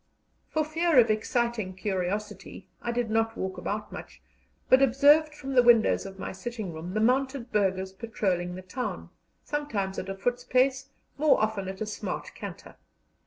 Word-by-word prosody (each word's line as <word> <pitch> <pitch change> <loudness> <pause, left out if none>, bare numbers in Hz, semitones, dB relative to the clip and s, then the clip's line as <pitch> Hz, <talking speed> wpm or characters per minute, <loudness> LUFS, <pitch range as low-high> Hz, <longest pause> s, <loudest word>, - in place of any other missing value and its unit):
For 310 -1 0
fear 325 0 +1
of 235 -3 +7
exciting 220 -3 -1
curiosity, 195 +1 -4
I 240 - -2
did 235 -2 -1
not 225 0 +1
walk 190 -1 -4
about 210 +4 -4
much, - - -9 0.5
but 260 - +6
observed 290 +4 +5
from 275 -2 -6
the 250 - +7
windows 235 -4 +4
of 195 0 -10
my - - -5
sitting 215 -2 -6
room 170 +4 -7
the - - +2
mounted 260 +2 +1
burghers 190 -2 0
patrolling 190 -5 -2
the 185 - -8
town, 245 +7 -5 0.3
sometimes 220 -11 -2
at - - -6
a 195 - -3
foot's 245 +5 -1
pace, 260 +2 +1 0.3
more 305 -1 +4
often 215 -3 -1
at 190 +1 -7
a - - 0
smart 210 - -5
canter. - - -9
225 Hz, 165 wpm, -28 LUFS, 195-260 Hz, 0.5 s, of